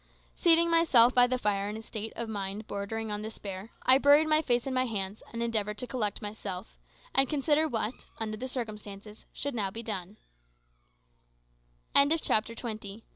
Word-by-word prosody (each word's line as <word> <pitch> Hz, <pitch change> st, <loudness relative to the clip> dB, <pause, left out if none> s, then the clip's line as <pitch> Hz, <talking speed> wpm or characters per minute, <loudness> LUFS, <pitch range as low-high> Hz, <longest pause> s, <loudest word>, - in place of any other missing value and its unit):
Seating 335 Hz, -1 st, +5 dB
myself 265 Hz, -8 st, +6 dB
by 245 Hz, 0 st, +6 dB
the 255 Hz, 0 st, 0 dB
fire 205 Hz, -3 st, -1 dB
in 210 Hz, -, -5 dB
a 220 Hz, -, -9 dB
state 220 Hz, 0 st, -6 dB
of 235 Hz, -, -4 dB
mind 205 Hz, 0 st, -4 dB
bordering 215 Hz, +2 st, -4 dB
on 210 Hz, 0 st, -2 dB
despair, 205 Hz, -2 st, -7 dB
I 260 Hz, +1 st, +6 dB
buried 290 Hz, +2 st, +6 dB
my 310 Hz, 0 st, +4 dB
face 240 Hz, -5 st, +1 dB
in 270 Hz, -, -3 dB
my 255 Hz, 0 st, +1 dB
hands, 200 Hz, -2 st, -4 dB
and 235 Hz, 0 st, -3 dB
endeavoured 210 Hz, -3 st, -1 dB
to 250 Hz, -, -3 dB
collect 225 Hz, -4 st, -3 dB
myself, 205 Hz, -2 st, -7 dB, 0.3 s
and 270 Hz, -1 st, +4 dB
consider 300 Hz, +2 st, +2 dB
what, 225 Hz, -3 st, -3 dB
under 215 Hz, -1 st, -3 dB
the 250 Hz, +4 st, -5 dB
circumstances, 210 Hz, -4 st, -7 dB
should 285 Hz, -, -3 dB
be -, -, -5 dB
now 200 Hz, -3 st, 0 dB
done. 205 Hz, -2 st, -6 dB, 2.0 s
CHAPTER 220 Hz, -4 st, +1 dB
TWENTY 215 Hz, -4 st, -5 dB
ONE. 210 Hz, +3 st, -12 dB
225 Hz, 175 wpm, -29 LUFS, 210-255 Hz, 2.0 s, myself